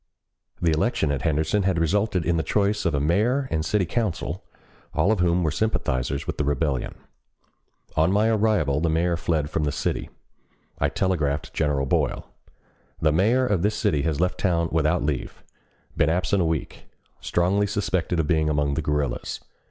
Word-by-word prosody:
The 85 Hz, -, +2 dB
election 80 Hz, -2 st, +1 dB
at 70 Hz, -2 st, -2 dB
Henderson 80 Hz, +5 st, +1 dB
had 95 Hz, -2 st, +1 dB
resulted 90 Hz, +1 st, +1 dB
in 85 Hz, -, +1 dB
the 80 Hz, -, +1 dB
choice 105 Hz, +3 st, 0 dB
of 85 Hz, -4 st, +1 dB
a -, -, +1 dB
mayor 110 Hz, -, +1 dB
and 80 Hz, -1 st, 0 dB
city 95 Hz, +4 st, +1 dB
council, 110 Hz, -1 st, -2 dB, 0.5 s
all 85 Hz, +7 st, +3 dB
of 110 Hz, -, +1 dB
whom 90 Hz, 0 st, +2 dB
were 80 Hz, -, +1 dB
sympathizers 70 Hz, -, -1 dB
with -, -, -5 dB
the -, -, +2 dB
rebellion. 70 Hz, -2 st, -1 dB, 1.0 s
On 80 Hz, +3 st, +3 dB
my 105 Hz, +3 st, +3 dB
arrival 105 Hz, -10 st, +2 dB
the 85 Hz, -, +1 dB
mayor 85 Hz, +2 st, +1 dB
fled 80 Hz, -3 st, -1 dB
from 80 Hz, -, -1 dB
the 75 Hz, -, 0 dB
city. -, -, -2 dB, 0.7 s
I -, -, +2 dB
telegraphed 75 Hz, -7 st, -1 dB
General 70 Hz, -3 st, 0 dB
Boyle: 65 Hz, -, 0 dB, 0.7 s
"The 80 Hz, -, +3 dB
mayor 110 Hz, +11 st, +3 dB
of 100 Hz, -7 st, +1 dB
this 105 Hz, +3 st, +1 dB
city 75 Hz, -, +1 dB
has 75 Hz, 0 st, -1 dB
left 90 Hz, +1 st, 0 dB
town 85 Hz, -3 st, +1 dB
without 80 Hz, -3 st, +1 dB
leave. 70 Hz, -3 st, -3 dB, 0.5 s
Been -, -, +2 dB
absent 90 Hz, +3 st, +1 dB
a -, -, +2 dB
week. 80 Hz, -2 st, -3 dB, 0.3 s
Strongly 95 Hz, +4 st, +1 dB
suspected 95 Hz, -4 st, -1 dB
of 80 Hz, -, +1 dB
being 80 Hz, 0 st, +1 dB
among 75 Hz, -1 st, +1 dB
the 80 Hz, -, -1 dB
guerrillas. 75 Hz, -3 st, -2 dB
80 Hz, 175 wpm, -24 LUFS, 75-100 Hz, 1.0 s, all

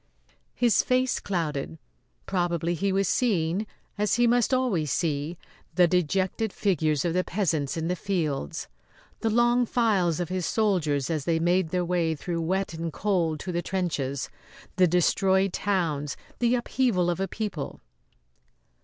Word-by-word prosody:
His 240 Hz, -3 st, +3 dB
face 255 Hz, 0 st, +1 dB
clouded. 150 Hz, -, -3 dB, 0.5 s
Probably 175 Hz, -2 st, 0 dB
he 195 Hz, +4 st, 0 dB
was 195 Hz, +1 st, +1 dB
seeing, 195 Hz, -4 st, +1 dB, 0.3 s
as 210 Hz, 0 st, +2 dB
he 240 Hz, +1 st, +3 dB
must 240 Hz, 0 st, +3 dB
always 235 Hz, -, +1 dB
see, 155 Hz, +1 st, -1 dB, 0.4 s
the 180 Hz, -2 st, +6 dB
dejected 185 Hz, +5 st, 0 dB
figures 155 Hz, -8 st, 0 dB
of 170 Hz, -, 0 dB
the 185 Hz, +1 st, +1 dB
peasants 165 Hz, -8 st, -1 dB
in 165 Hz, 0 st, -2 dB
the 180 Hz, -, 0 dB
fields; 160 Hz, -, -2 dB, 0.5 s
the 225 Hz, -, 0 dB
long 240 Hz, +2 st, +3 dB
files 195 Hz, -10 st, +2 dB
of 175 Hz, -, -2 dB
his 185 Hz, -2 st, -2 dB
soldiers 170 Hz, -, +1 dB
as 155 Hz, -4 st, -2 dB
they 165 Hz, -1 st, +2 dB
made 175 Hz, +1 st, +2 dB
their 180 Hz, +1 st, 0 dB
way 170 Hz, -2 st, 0 dB
through 170 Hz, +3 st, -3 dB
wet 190 Hz, +3 st, -1 dB
and 165 Hz, 0 st, -4 dB
cold 170 Hz, -5 st, 0 dB
to 185 Hz, -, -4 dB
the 175 Hz, 0 st, -1 dB
trenches; 155 Hz, -8 st, -2 dB, 0.5 s
the 185 Hz, -1 st, +5 dB
destroyed 190 Hz, +2 st, +2 dB
towns; 160 Hz, -8 st, -1 dB, 0.2 s
the 240 Hz, 0 st, +3 dB
upheaval 240 Hz, -7 st, +1 dB
of 175 Hz, -, -3 dB
a 195 Hz, -, 0 dB
people. 195 Hz, -8 st, -5 dB
180 Hz, 150 wpm, -26 LUFS, 160-200 Hz, 0.5 s, the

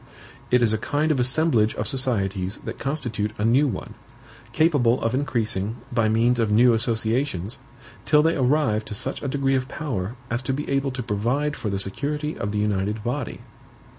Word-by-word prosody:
It 125 Hz, -1 st, +4 dB
is 110 Hz, -2 st, +3 dB
a 110 Hz, -, 0 dB
kind 150 Hz, +6 st, 0 dB
of 140 Hz, -, +1 dB
assemblage 125 Hz, -3 st, +2 dB
of -, -, -2 dB
societies 100 Hz, -8 st, -1 dB
that -, -, -6 dB
constitute 120 Hz, -7 st, -2 dB
a 105 Hz, -, 0 dB
new 130 Hz, +6 st, +4 dB
one, 105 Hz, -8 st, -5 dB, 0.6 s
capable 130 Hz, -4 st, +3 dB
of 115 Hz, +1 st, -1 dB
increasing, 115 Hz, -6 st, -1 dB, 0.2 s
by 115 Hz, -3 st, +2 dB
means 120 Hz, +2 st, +3 dB
of 110 Hz, -2 st, +1 dB
new 120 Hz, +3 st, +6 dB
associations, 115 Hz, -2 st, -1 dB, 0.4 s
till 150 Hz, -1 st, +4 dB
they 165 Hz, +1 st, +2 dB
arrive 130 Hz, -5 st, +2 dB
to 105 Hz, -, -6 dB
such -, -, -3 dB
a -, -, -3 dB
degree 135 Hz, 0 st, +1 dB
of 130 Hz, -1 st, 0 dB
power 120 Hz, -9 st, -4 dB, 0.2 s
as 120 Hz, +1 st, 0 dB
to 130 Hz, +1 st, -2 dB
be 145 Hz, +3 st, -3 dB
able 135 Hz, 0 st, +1 dB
to 125 Hz, -1 st, -4 dB
provide 120 Hz, +8 st, 0 dB
for 105 Hz, -, -3 dB
the 100 Hz, -, -1 dB
security 150 Hz, +10 st, -3 dB
of 100 Hz, -, -3 dB
the 105 Hz, -, -2 dB
united 105 Hz, 0 st, 0 dB
body." 125 Hz, +2 st, -3 dB
120 Hz, 185 wpm, -24 LUFS, 110-140 Hz, 0.6 s, new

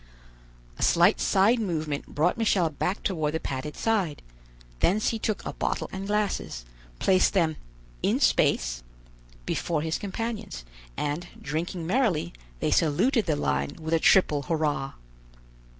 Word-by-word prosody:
A -, -, -6 dB
slight 175 Hz, +5 st, +4 dB
side 210 Hz, +5 st, +3 dB
movement 155 Hz, -8 st, -2 dB
brought 160 Hz, +5 st, +1 dB
Michel 200 Hz, -8 st, +2 dB
back 180 Hz, +7 st, -2 dB
toward 155 Hz, -5 st, -1 dB
the -, -, 0 dB
padded 140 Hz, +1 st, -5 dB
side; 195 Hz, -10 st, 0 dB, 0.6 s
thence 210 Hz, +5 st, +2 dB
he 225 Hz, -, -2 dB
took 215 Hz, -1 st, -2 dB
a -, -, -4 dB
bottle -, -, -2 dB
and 190 Hz, +1 st, -5 dB
glasses, 205 Hz, -, -1 dB, 0.3 s
placed 185 Hz, -, +3 dB
them 165 Hz, -4 st, +2 dB, 0.5 s
"in -, -, +1 dB
space" -, -, +2 dB, 0.6 s
before 160 Hz, -3 st, -1 dB
his 160 Hz, 0 st, -1 dB
companions, 205 Hz, -, -5 dB, 0.3 s
and, 150 Hz, +4 st, -2 dB
drinking 165 Hz, +2 st, -3 dB
merrily, 185 Hz, -, +1 dB, 0.3 s
they -, -, +1 dB
saluted 210 Hz, -, +2 dB
the -, -, +2 dB
line 70 Hz, -1 st, -1 dB
with 160 Hz, +1 st, -3 dB
a 165 Hz, -, +4 dB
triple 155 Hz, -5 st, +4 dB
hurrah. 145 Hz, -2 st, -1 dB
165 Hz, 135 wpm, -27 LUFS, 150-200 Hz, 0.6 s, slight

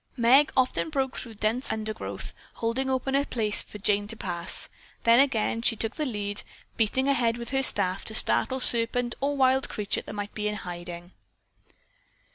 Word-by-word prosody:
Meg 255 Hz, +5 st, +5 dB
often 260 Hz, +4 st, +1 dB
broke 270 Hz, -3 st, -2 dB
through 230 Hz, -3 st, -6 dB
dense 220 Hz, +5 st, 0 dB
undergrowth, 215 Hz, 0 st, -4 dB, 0.2 s
holding 240 Hz, +4 st, -1 dB
open 265 Hz, +1 st, -1 dB
a 280 Hz, +1 st, +3 dB
place 215 Hz, -6 st, -1 dB
for -, -, -10 dB
Jane 205 Hz, 0 st, +1 dB
to 225 Hz, -, -5 dB
pass, 175 Hz, -4 st, -3 dB, 0.4 s
then 230 Hz, +1 st, +6 dB
again 230 Hz, -4 st, +1 dB
she 230 Hz, -, +3 dB
took 225 Hz, +2 st, -3 dB
the 305 Hz, -2 st, -2 dB
lead, 205 Hz, -3 st, -3 dB, 0.3 s
beating 235 Hz, +5 st, 0 dB
ahead 240 Hz, -4 st, +2 dB
with 235 Hz, +1 st, -7 dB
her 270 Hz, 0 st, +2 dB
staff 195 Hz, -7 st, 0 dB
to 220 Hz, -, 0 dB
startle 260 Hz, +4 st, +3 dB
serpent 240 Hz, 0 st, +4 dB
or 285 Hz, +1 st, 0 dB
wild 265 Hz, 0 st, +3 dB
creature 210 Hz, -2 st, -1 dB
that -, -, -9 dB
might 205 Hz, 0 st, -5 dB
be 210 Hz, -1 st, -2 dB
in 210 Hz, -, -2 dB
hiding. 175 Hz, -1 st, -8 dB
230 Hz, 175 wpm, -26 LUFS, 210-260 Hz, 0.4 s, then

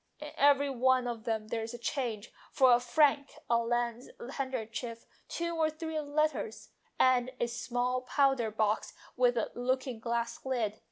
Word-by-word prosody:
In 300 Hz, 0 st, -7 dB
every 285 Hz, 0 st, +4 dB
one 260 Hz, 0 st, +3 dB
of 230 Hz, -2 st, -5 dB
them 220 Hz, -2 st, -2 dB
there 225 Hz, -, -2 dB
is 225 Hz, +2 st, -5 dB
change 235 Hz, -3 st, -3 dB, 0.2 s
for 260 Hz, -2 st, +5 dB
,a 240 Hz, -, +5 dB
franc, 280 Hz, +2 st, +2 dB, 0.2 s
a 235 Hz, -, +5 dB
lace 240 Hz, +1 st, -1 dB, 0.2 s
handkerchief, 235 Hz, -3 st, -4 dB, 0.2 s
two 340 Hz, 0 st, -3 dB
or 320 Hz, -1 st, +2 dB
three 315 Hz, 0 st, -4 dB
letters, 295 Hz, -6 st, -1 dB, 0.3 s
and 255 Hz, -1 st, +4 dB
a -, -, +2 dB
small 245 Hz, +2 st, -1 dB
powder 270 Hz, -3 st, +2 dB
box 215 Hz, 0 st, -1 dB, 0.2 s
with 245 Hz, -1 st, +3 dB
a 225 Hz, -, -1 dB
look 255 Hz, +2 st, -1 dB
ing 250 Hz, -4 st, -5 dB
glass 235 Hz, 0 st, -2 dB
lid. 230 Hz, -5 st, -1 dB
245 Hz, 160 wpm, -31 LUFS, 235-275 Hz, 0.3 s, for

